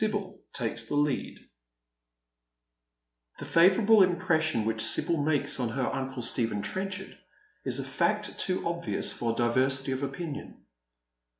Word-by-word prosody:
BIBTL 205 -3 -2
TAKES 115 -2 -1
THE 145 - -3
LEAD, 145 -2 -1 2.0
The - - -8
favourable 200 +5 +5
impression 160 - +1
which 110 0 0
Sibyl 165 +8 +2
makes 145 -2 +1
on 120 -2 -1
her 130 +2 -2
uncle 130 -2 -4
Stephen 115 -3 0
Trenchard 190 0 -4 0.5
is - - +2
a - - -2
fact - - -1
too 185 -1 -1
obvious 170 0 +1
for 115 -1 -2
diversity 130 +3 +1
of 130 +1 -3
opinion. 140 +2 -6
145 Hz, 125 wpm, -28 LUFS, 125-185 Hz, 2.0 s, favourable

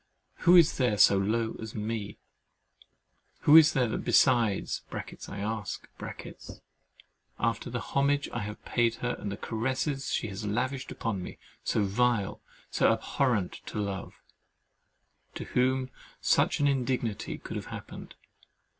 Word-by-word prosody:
Who 175 +1 +8
is 170 -3 +6
there 125 -6 +2
so 100 - +7
low 110 +3 0
as 110 -1 -7
me? 110 -1 -4 1.2
Who 150 - +6
is 160 -1 +8
there 125 -5 +1
besides 120 -6 +2 0.5
(I 100 - -7
ask) 105 -1 -4 1.5
after - - -1
the - - -3
homage 140 +1 +1
I 120 - -2
have 105 -1 -7
paid 115 -1 +1
her 120 +1 -2
and 100 - -4
the 100 - -5
caresses 130 +4 -2
she 115 - 0
has 100 +2 -6
lavished 130 +6 -2
on 105 -5 0
me, - - -8 0.3
so 105 - +1
vile, 105 0 +1 0.3
so - - +4
abhorrent 115 -9 0
to - - -4
love, 100 -2 -4 1.2
to - - -4
whom 130 +1 0 0.3
such - - +2
an 145 - +3
indignity 125 -5 -1
could - - -8
have - - -5
happened? - - -9
115 Hz, 135 wpm, -29 LUFS, 105-130 Hz, 1.5 s, Who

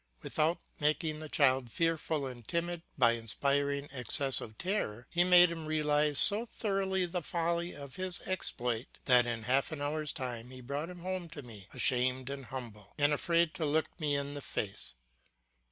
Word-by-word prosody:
Without 160 +3 +2 0.2
making 155 +1 +1
the 155 -1 -7
child 130 -5 +3
fearful 160 -2 0
and 120 -4 -8
timid 170 0 -1 0.2
by 120 -4 +6
inspiring 140 +5 0
excessive 125 -2 -1
terror, 150 - -2
he 175 0 +4
made 180 -1 +8
him 165 -2 -5
realise 150 -1 +2
so 210 +3 +3
thoroughly 195 -5 -1
the 175 0 -3
folly 170 +2 -1
of 140 -2 -9
his 185 -1 +2
exploit 125 -10 -3
that 125 -2 +6
in 115 -2 -2
half 130 +6 +1
an 155 - -5
hour's 150 +1 -1
time 125 -2 -5
he 130 0 -10
brought 140 +6 -4
him 180 -1 -9
home 185 -1 -3
to 155 -3 -8
me, 105 -6 -11
ashamed 130 +1 +1
and 140 -1 -6
humble, 115 -6 -8
and 145 0 +4
afraid 170 +2 +2
to 180 - -3
look 155 +1 +2
me 150 -2 +1
in 140 0 -2
the 145 - -6
face. 100 - -3
145 Hz, 170 wpm, -32 LUFS, 125-170 Hz, 0.2 s, made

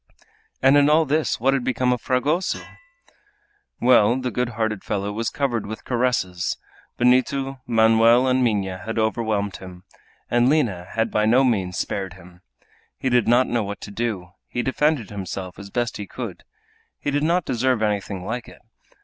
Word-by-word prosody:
And 135 +2 +6
in 145 0 +5
all 160 +1 +4
this 155 +2 0
what 135 +4 +2
had 135 -2 0
become 125 0 +1
of 125 - -4
Fragoso? 150 +8 0 1.2
Well, 120 0 +4
the 130 -1 -3
good 125 0 -1
hearted 110 -3 -1
fellow 100 0 -2
was 115 +2 -2
covered 120 -7 -2
with 110 +1 -7
caresses! 120 -9 0 0.4
Benito, 130 +2 +2
Manoel, 115 +1 +5
and 130 0 +2
Minha 100 -5 0
had 110 +5 -5
overwhelmed 110 -2 0
him, 90 -1 -11 0.4
and 120 +1 +3
Lina 115 - +1
had 115 0 0
by 105 0 +2
no 125 +4 +5
means 95 -8 0
spared 95 -3 -3
him. 90 -1 -16 0.6
He 130 - -1
did 120 -2 +3
not 120 +2 +5
know 120 -3 -1
what 100 0 -6
to 100 - -8
do, 100 -5 -3 0.2
he 120 - -3
defended 130 -4 0
himself 95 -2 -6
as 100 0 -9
best 120 +1 -2
he 105 - -6
could. - - -7 0.5
He 145 - -2
did 145 +1 0
not 170 +2 +1
deserve 125 -1 +1
anything 100 -3 -2
like 120 +2 -4
it. - - -17
115 Hz, 170 wpm, -23 LUFS, 100-130 Hz, 1.2 s, And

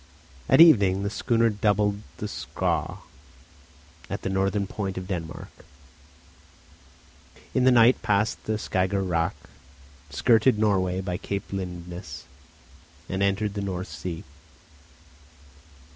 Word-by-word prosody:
At - - +5
evening 100 - +6
the 100 - -2
schooner 115 0 +2
doubled 105 0 +1 0.2
the - - -4
Skaw - - -3 1.1
at - - -5
the 95 - -2
northern 95 +1 0
point 95 -1 -4
of 95 - -4
Denmark, 85 -4 -5 2.0
in 130 - +2
the 130 - +6
night 120 +1 +5
passed 105 +2 0
the 110 - -1
Skager 95 -1 -1
Rack, 85 -1 0 0.7
skirted 115 - +3
Norway 95 -3 +1
by 90 -2 -3
Cape 100 0 -5
Lindness, 90 -4 -6 0.8
and 95 +1 -3
entered 100 +1 +1
the 100 - -3
North 95 -2 -4
Sea. 85 -3 -6
100 Hz, 115 wpm, -25 LUFS, 95-105 Hz, 2.0 s, evening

